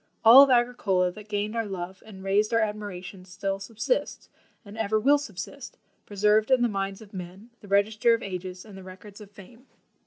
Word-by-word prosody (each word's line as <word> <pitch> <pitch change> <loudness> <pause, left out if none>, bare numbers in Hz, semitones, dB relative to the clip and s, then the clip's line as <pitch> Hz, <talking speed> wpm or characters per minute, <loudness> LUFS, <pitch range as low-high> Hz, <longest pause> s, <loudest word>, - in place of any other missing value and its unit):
All 240 +5 +10
of 280 - +6
Agricola 240 -7 +1
that 210 +3 -13
gained 210 +1 -2
our 225 -2 -2
love 190 -1 -7
and 190 -3 -12
raised 205 +3 +1
our - - +4
admiration 205 -4 -5
still 195 +2 -4
subsists, 225 - -3 0.4
and 200 +1 -11
ever 220 -1 0
will 285 +6 +4
subsist, 265 +2 -8 0.3
preserved 210 +2 +2
in 260 -2 +3
the - - +3
minds 195 -1 -4
of 205 - -19
men, 190 +5 -9
the 205 - -15
register 215 +4 +2
of 230 - -7
ages 185 0 -7
and 210 -3 -13
the 190 - -10
records 190 +3 -13
of 205 - -12
fame." 220 +6 -16
205 Hz, 190 wpm, -26 LUFS, 190-225 Hz, 0.4 s, All